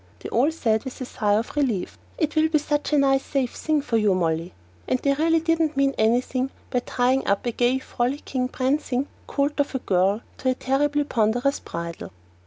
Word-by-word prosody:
They - - -6
all 255 +6 +3
said, 225 -9 0
with 260 - -7
a 255 - -4
sigh 205 -4 0
of 225 +6 -2
relief, 250 -11 0 0.2
"It 310 -3 -1
will 315 0 +3
be 315 - +3
such 295 0 -1
a 300 - +4
nice 270 -1 +3
safe 265 -4 -1
thing 310 -2 0
for 230 -5 0
you, 210 -3 +3
Molly." 165 -1 -1 0.4
And - - +2
they 280 +2 +1
really 325 +3 +2
didn't 325 -2 +1
mean 275 0 +3
anything 250 +4 +1 0.2
by 250 - +2
tying 255 +2 0
up 200 +3 +1
a 240 - 0
gay, 245 +2 +2
frolicking, 255 0 -2
prancing 265 0 -1 0.2
colt 285 +1 -1
of 285 -1 0
a - - +3
girl 195 -1 +1 0.2
with - - -15
a 255 - +3
terribly 290 +2 +1
ponderous 245 +2 +1
bridle. 170 0 -6
260 Hz, 195 wpm, -24 LUFS, 230-290 Hz, 0.4 s, a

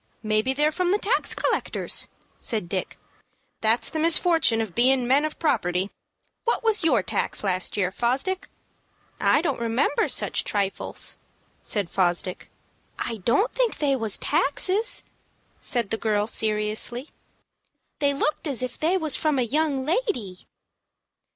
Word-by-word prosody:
"Maybe 215 +3 +1
they're 295 +3 +2
from 355 +2 0
the 405 - +3
tax 420 +3 0
collectors," - - 0 0.3
said 215 -6 -2
Dick. 185 +1 -3 0.6
"That's 225 +2 +1
the 315 - -2
misfortun' 325 -6 +4
of 220 -5 -3
being 255 +3 +3
men 280 +4 +4
of 310 - -5
property. 185 - 0 0.5
What 470 - 0
was 445 -4 +3
your 245 - +3
tax - - -1
last 185 -1 -1
year, 185 -3 +1
Fosdick?" 260 - -1 0.7
"I 310 - +3
don't 285 -8 -1
remember 235 +5 +1
such - - 0
trifles," 200 -2 -2 0.4
said 205 -4 -1
Fosdick. 180 0 -1 0.5
"I 230 - -3
don't 245 - +1
think - - 0
they 280 -2 +1
was 225 -5 0
taxes," 390 - +1 0.6
said 235 -5 -2
the 225 - +1
girl, 210 -2 0
seriously; 215 +4 0 0.9
"they 285 -1 +2
looked 300 +3 -1
as 260 -4 0
if 250 -1 -5
they 340 +5 +2
was 315 -5 0
from 305 -3 +1
a 255 - +2
young 280 +2 0
lady." 300 - -2
255 Hz, 140 wpm, -25 LUFS, 215-315 Hz, 0.9 s, misfortun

